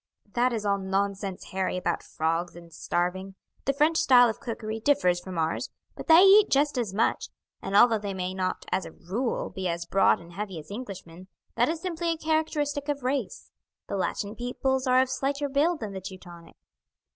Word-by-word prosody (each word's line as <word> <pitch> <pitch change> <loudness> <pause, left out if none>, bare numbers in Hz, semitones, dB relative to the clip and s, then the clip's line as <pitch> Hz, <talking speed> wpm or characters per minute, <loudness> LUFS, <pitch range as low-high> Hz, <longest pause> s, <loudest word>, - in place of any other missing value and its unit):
"That 245 +1 +2
is 220 -3 -3
all 200 -1 +1
nonsense, 195 0 -3
Harry, 190 -1 -1
about 175 -2 -1
frogs 165 +2 -2
and 170 -1 -13
starving. 185 +4 -2 0.3
The 275 - +2
French 305 +4 +2
style 245 -5 +6
of 220 - -5
cookery 220 -2 -5
differs 195 -9 +2
from 185 -1 -8
ours, 160 0 -1 0.3
but - - -9
they 330 +2 +8
eat 405 +2 +7
just 290 +1 +2
as 225 -5 -2
much, 215 +4 0 0.3
and 195 - -3
although 225 +1 +6
they 200 -2 -5
may 185 0 -3
not, 185 -1 -3
as 185 +1 +1
a 160 - -12
rule, 225 +8 -3
be 190 -1 -4
as 170 0 -3
broad 195 +3 +3
and 170 0 -14
heavy 195 -1 -5
as 155 +4 -10
Englishmen, 190 -6 -8 0.3
that 240 +3 +2
is 325 0 -3
simply 345 -2 -2
a 330 - 0
characteristic 305 -2 -1
of 285 -2 -2
race; 275 - -3 0.3
the - - -4
Latin 200 +2 -2
peoples 260 +2 -1
are 255 0 +5
of 260 - -6
slighter 280 +2 -1
build 300 +4 +1
than 210 -2 -5
the 190 - -6
Teutonic. 180 -3 -11
210 Hz, 190 wpm, -27 LUFS, 185-275 Hz, 0.3 s, they